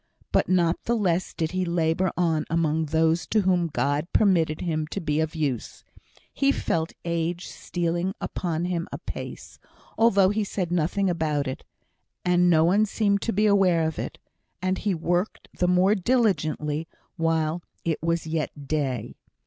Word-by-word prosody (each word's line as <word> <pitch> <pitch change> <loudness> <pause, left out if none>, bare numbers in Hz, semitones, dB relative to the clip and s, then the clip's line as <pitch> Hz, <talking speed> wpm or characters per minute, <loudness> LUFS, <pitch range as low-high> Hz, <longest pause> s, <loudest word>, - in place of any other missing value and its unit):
But - - +2
not 175 -2 +2
the 235 - +1
less 185 -5 0
did 160 -2 -2
he 185 0 -1
labour 170 +1 +1
on 165 -3 +1
among 160 -1 +1
those 160 +2 +1
to 215 - +2
whom 180 -3 +2
God 145 +2 0
permitted 170 -7 +2
him 155 -3 -1
to 195 - -4
be 150 -4 -1
of 160 +1 -1
use. 140 -7 -3 0.5
He 275 0 +3
felt 165 -10 -1
age 170 +1 -2
stealing 175 +2 -2
upon 170 -1 -2
him 175 -2 -2
apace, - - -7 0.4
although 200 -4 +5
he 210 +1 0
said 185 -3 -3
nothing 180 +4 +1
about 155 -5 0
it, 130 - -5 0.6
and 180 0 +4
no 160 -2 +5
one 200 +6 +3
seemed 200 -1 +1
to 230 - -1
be 210 +2 +2
aware 190 -5 +4
of 160 - -4
it; - - -5 0.4
and 185 +1 -1
he 200 -3 0
worked 175 +4 -1
the 180 - +3
more 180 +3 +4
diligently 175 - 0 0.3
while 165 0 0 0.2
"it 165 -2 -1
was 165 0 0
yet 155 -3 -3
day." 130 -7 -2
170 Hz, 160 wpm, -25 LUFS, 160-185 Hz, 0.6 s, although